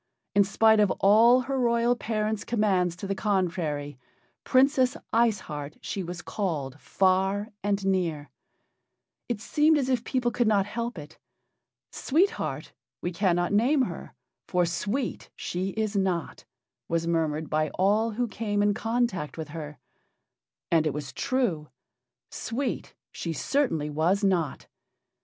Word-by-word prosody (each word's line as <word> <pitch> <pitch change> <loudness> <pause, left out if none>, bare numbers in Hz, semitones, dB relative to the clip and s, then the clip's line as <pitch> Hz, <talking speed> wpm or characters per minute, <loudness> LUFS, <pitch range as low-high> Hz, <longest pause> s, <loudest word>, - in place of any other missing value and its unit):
In 200 - +5
spite 220 +2 +4
of 205 -2 +4
all 230 +5 +6
her 265 +1 -2
royal 235 0 +2
parents' 215 -2 -2
commands 195 -6 +1
to 180 - -7
the 195 - -1
contrary, 170 - -1 0.4
"Princess 260 -1 +3 0.2
Ice 225 -3 +3
Heart" 150 -3 -7
she 195 - -4
was 175 0 -6
called 150 - -3
far 190 +4 +1
and 200 -1 -1
near. 165 -8 -1 1.0
It 235 -3 -1
seemed 300 +7 +3
as 265 -3 0
if 250 -3 +1
people 245 -2 0
could 240 -1 +1
not 200 -3 +3
help 235 +1 -4
it. 150 0 -10 0.7
"Sweet 350 +9 +2
Heart - - -5 0.3
we 175 - -2
cannot 175 0 +1
name 260 +7 +3
her, - - -6 0.3
for 180 -1 +2
sweet 210 +9 -3
she 185 +2 -3
is 215 -1 -1
not," 185 -5 -1 0.4
was 165 0 0
murmured 160 -2 0
by 155 0 0
all 210 +4 +2
who 240 +2 -1
came 205 -1 -1
in 205 0 +3
contact 225 -9 -1
with 160 -2 -5
her. 150 -1 -7 0.9
And 160 -2 +3
it 145 - -2
was 145 -2 -5
true. 235 - -1 0.6
Sweet 245 +2 -4 0.2
she 165 - -4
certainly 160 - 0
was 175 +7 +1
not. 180 -6 0
200 Hz, 140 wpm, -27 LUFS, 170-235 Hz, 1.0 s, all